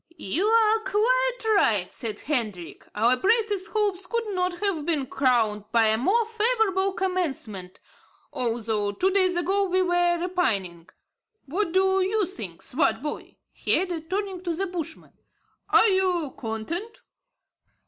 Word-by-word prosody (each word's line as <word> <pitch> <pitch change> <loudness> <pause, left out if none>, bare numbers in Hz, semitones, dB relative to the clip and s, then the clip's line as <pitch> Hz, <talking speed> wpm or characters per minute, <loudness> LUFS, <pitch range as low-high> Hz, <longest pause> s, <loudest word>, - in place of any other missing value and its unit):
"You 320 - -1
are 445 0 +4
quite - - +1 0.2
right," 210 - +1
said 220 -5 -5
Hendrik; 215 - -3
"our 230 +4 +3
brightest 415 - +1
hopes 410 -3 -1
could 465 -1 -2
not 365 -2 -1
have 390 -6 0
been 305 -4 +1
crowned 230 -6 +1
by 230 -2 +4
a 220 - +2
more 430 - +2
favourable 440 -4 +1
commencement, 270 - -3 0.5
although 225 -4 -1
two 375 - +1
days 370 -2 +2
ago 390 +3 +1
we 370 +1 +2
were 350 -1 +2
repining. 200 - -1 0.6
What 335 +6 -1
do 380 0 +3
you 400 +2 +1
say, 210 - -6
Swartboy?" 285 - -2 0.2
he - - +1
added, 345 -3 -4
turning 385 -2 -3
to 345 -2 -3
the 385 +4 -1
Bushman; 335 -3 -7 0.6
"are - - +6
you 365 -7 +1
content?" 255 - -5
355 Hz, 135 wpm, -25 LUFS, 240-395 Hz, 0.6 s, are